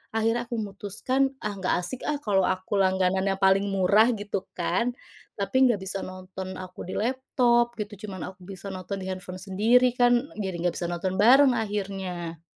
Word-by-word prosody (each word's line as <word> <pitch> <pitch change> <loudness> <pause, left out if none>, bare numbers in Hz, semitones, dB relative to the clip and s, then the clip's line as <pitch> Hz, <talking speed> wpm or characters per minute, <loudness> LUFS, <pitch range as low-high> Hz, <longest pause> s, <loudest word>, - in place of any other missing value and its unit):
akhirnya 225 +2 +1
aku 235 -1 -3
memutuskan, 210 +7 -1
"Ah, 210 -1 -4
nggak 190 -1 -1
asik 250 +8 -5
ah, 300 -1 -1
kalau 200 -7 +2
aku 185 +2 -1
langganan 190 -1 +2
yang 195 -1 0
paling 195 0 +4
murah," 200 +5 +4
gitu 205 -3 -3
kan, 185 +8 0 0.5
"tapi 260 +7 +2
nggak 220 -5 +1
bisa 190 0 -5
nonton 185 0 -7
aku 185 -1 -8
di 185 - -7
laptop," 240 0 +2
gitu, 210 0 -6
"cuman 190 -3 -6
aku 180 -1 -19
bisa 195 +1 -9
nonton 190 +1 -5
di 190 - -6
handphone 185 0 -6
sendiri 225 +6 +3
kan, 245 +2 +3
jadi 190 -4 -3
nggak - - -2
bisa 175 -1 -3
nonton 185 +2 -2
bareng 255 +5 +6
akhirnya." 190 -6 -4
195 Hz, 175 wpm, -26 LUFS, 185-235 Hz, 0.5 s, bareng